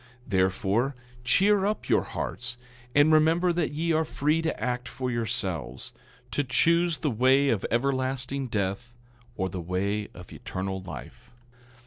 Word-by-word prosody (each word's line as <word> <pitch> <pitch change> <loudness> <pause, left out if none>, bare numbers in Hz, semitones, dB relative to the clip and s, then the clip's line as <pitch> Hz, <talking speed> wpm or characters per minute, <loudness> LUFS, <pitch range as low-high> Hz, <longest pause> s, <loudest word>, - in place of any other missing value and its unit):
10:23 - - -20
Therefore, 100 +7 +1 0.3
cheer 195 - +4
up 215 - -2
your - - +4
hearts, 120 +3 -4 0.4
and 145 +2 +6
remember 165 +3 +4
that 170 -2 0
ye 165 +3 -1
are 160 0 +3
free 155 +1 +1
to 165 - -2
act 125 +2 -2
for 125 0 -3
yourselves—to 115 - -3
choose 170 +5 +3
the 150 - -1
way 130 +4 +4
of 110 -6 +1
everlasting 130 +1 0
death 105 +3 -2 0.4
or 95 - 0
the 90 -1 -5
way 100 +4 -1
of 90 0 -11
eternal 95 0 -4
life. 95 - -10
125 Hz, 140 wpm, -27 LUFS, 100-150 Hz, 0.4 s, and